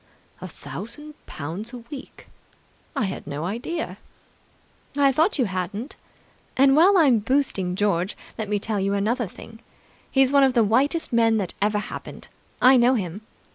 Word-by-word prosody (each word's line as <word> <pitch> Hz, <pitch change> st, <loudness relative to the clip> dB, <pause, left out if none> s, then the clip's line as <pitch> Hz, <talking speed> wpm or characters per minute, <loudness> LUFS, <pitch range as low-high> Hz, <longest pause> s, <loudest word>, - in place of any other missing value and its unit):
"A -, -, -5 dB
thousand 295 Hz, +8 st, -8 dB
pounds 175 Hz, -, -6 dB
a -, -, -5 dB
week! 275 Hz, -2 st, -10 dB, 0.7 s
I 220 Hz, -, 0 dB
had 190 Hz, -6 st, -6 dB
no 145 Hz, +1 st, -4 dB
idea!" 240 Hz, -, -4 dB, 1.0 s
"I 280 Hz, -1 st, +5 dB
thought 320 Hz, +9 st, +2 dB
you 255 Hz, -, +2 dB
hadn't. 195 Hz, -, -4 dB, 0.6 s
And, 270 Hz, +1 st, +5 dB
while 370 Hz, +6 st, +6 dB
I'm 275 Hz, -9 st, +5 dB
boosting 210 Hz, -6 st, 0 dB
George, 195 Hz, -2 st, 0 dB, 0.2 s
let 220 Hz, -2 st, -5 dB
me 210 Hz, -, +1 dB
tell 210 Hz, 0 st, -2 dB
you 195 Hz, +1 st, 0 dB
another 225 Hz, +4 st, 0 dB
thing. 225 Hz, +4 st, -13 dB, 0.5 s
He's 270 Hz, -1 st, +3 dB
one 280 Hz, -1 st, +5 dB
of 265 Hz, -1 st, +4 dB
the 235 Hz, -2 st, +4 dB
whitest 265 Hz, +8 st, +1 dB
men 225 Hz, -1 st, +4 dB
that 195 Hz, -5 st, -1 dB
ever 210 Hz, +1 st, +2 dB
happened. 210 Hz, -, -7 dB, 0.3 s
I 255 Hz, +1 st, +7 dB
know 245 Hz, +2 st, +4 dB
him. 190 Hz, -2 st, -4 dB
225 Hz, 160 wpm, -24 LUFS, 200-270 Hz, 1.0 s, I